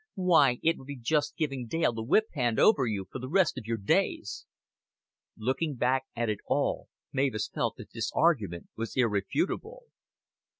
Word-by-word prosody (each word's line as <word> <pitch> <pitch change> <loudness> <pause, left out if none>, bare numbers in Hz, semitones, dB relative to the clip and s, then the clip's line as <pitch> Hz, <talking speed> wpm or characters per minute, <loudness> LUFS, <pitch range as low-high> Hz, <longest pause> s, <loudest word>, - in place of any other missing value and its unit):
Why, 160 -9 +4
it 165 +1 +2
would 130 - -13
be 140 -1 -6
just 150 +4 0
giving 135 -7 -2
Dale 160 -1 +1
the 115 - -4
whip 150 - +3
hand 120 -6 0
over 140 - +5
you 100 -4 -2
for - - -5
the 130 +1 -6
rest 185 -2 +3
of 110 - -12
your 115 0 -1
days." 100 - 0 0.9
Looking 135 +7 -1
back 130 +2 +1
at 120 0 -1
it 105 -2 -1
all, - - 0 0.2
Mavis 130 -5 0
felt - - -2
that - - -12
this - - -2
argument 110 - +1
was 115 +3 -5
irrefutable. 130 - -1
130 Hz, 170 wpm, -29 LUFS, 115-160 Hz, 0.9 s, over